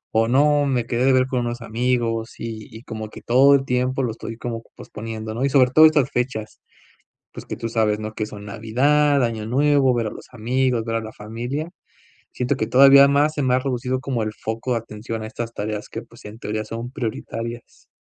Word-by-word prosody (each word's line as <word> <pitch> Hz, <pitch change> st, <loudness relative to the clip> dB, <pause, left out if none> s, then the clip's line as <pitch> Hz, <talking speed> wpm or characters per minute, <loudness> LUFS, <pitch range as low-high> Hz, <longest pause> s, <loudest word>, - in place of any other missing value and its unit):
o, 115 Hz, 0 st, +4 dB
no, 145 Hz, +3 st, +3 dB
me 125 Hz, -4 st, 0 dB
quedé 120 Hz, +1 st, 0 dB
de 135 Hz, -, +5 dB
ver 130 Hz, 0 st, +3 dB
con 130 Hz, -1 st, -1 dB
unos 120 Hz, 0 st, -4 dB
amigos", 115 Hz, -1 st, -1 dB
y 110 Hz, -2 st, -6 dB
y 115 Hz, -, -10 dB
como 110 Hz, -3 st, -6 dB
que -, -, -11 dB
todo 135 Hz, +4 st, +5 dB
el 135 Hz, -, +1 dB
tiempo 125 Hz, +1 st, 0 dB
lo 115 Hz, -, -1 dB
estoy 115 Hz, 0 st, -7 dB
como 115 Hz, -1 st, -5 dB
posponiendo, 110 Hz, 0 st, -7 dB
¿no?, 125 Hz, -, -2 dB
y -, -, +2 dB
sobre 130 Hz, -2 st, +4 dB
todo 155 Hz, +3 st, +8 dB
estas 150 Hz, -4 st, +4 dB
fechas. 120 Hz, -4 st, -3 dB, 0.7 s
Pues, -, -, -9 dB
que -, -, -5 dB
tú 115 Hz, -, -4 dB
sabes, 110 Hz, -2 st, +1 dB
¿no?, 110 Hz, 0 st, -5 dB
que 110 Hz, -, -3 dB
son 105 Hz, -1 st, -10 dB
Navidad, 135 Hz, +7 st, +2 dB
Año 110 Hz, -2 st, -2 dB
Nuevo, 140 Hz, 0 st, +3 dB
ver 115 Hz, -2 st, 0 dB
a -, -, -4 dB
los -, -, -10 dB
amigos, 125 Hz, 0 st, 0 dB
ver 115 Hz, 0 st, -2 dB
a -, -, -3 dB
la 110 Hz, 0 st, -8 dB
familia. 120 Hz, +9 st, -5 dB, 0.7 s
Siento 125 Hz, +2 st, 0 dB
que 110 Hz, -, -1 dB
todavía 140 Hz, +2 st, +8 dB
más 145 Hz, +2 st, +2 dB
se 145 Hz, -, -1 dB
me 130 Hz, -1 st, +1 dB
ha -, -, +4 dB
reducido 130 Hz, 0 st, -2 dB
como 125 Hz, -4 st, -2 dB
el 110 Hz, -, -3 dB
foco 115 Hz, +3 st, -3 dB
de 115 Hz, -, +1 dB
atención 110 Hz, 0 st, -7 dB
a -, -, -5 dB
estas 115 Hz, +1 st, -5 dB
tareas, 105 Hz, 0 st, -4 dB
que, 115 Hz, -, -5 dB
pues, 115 Hz, 0 st, -18 dB
en 110 Hz, +2 st, -10 dB
teoría 110 Hz, 0 st, -3 dB
son 115 Hz, +3 st, -6 dB
prioritarias. 115 Hz, -2 st, -6 dB
120 Hz, 220 wpm, -22 LUFS, 110-130 Hz, 0.7 s, todo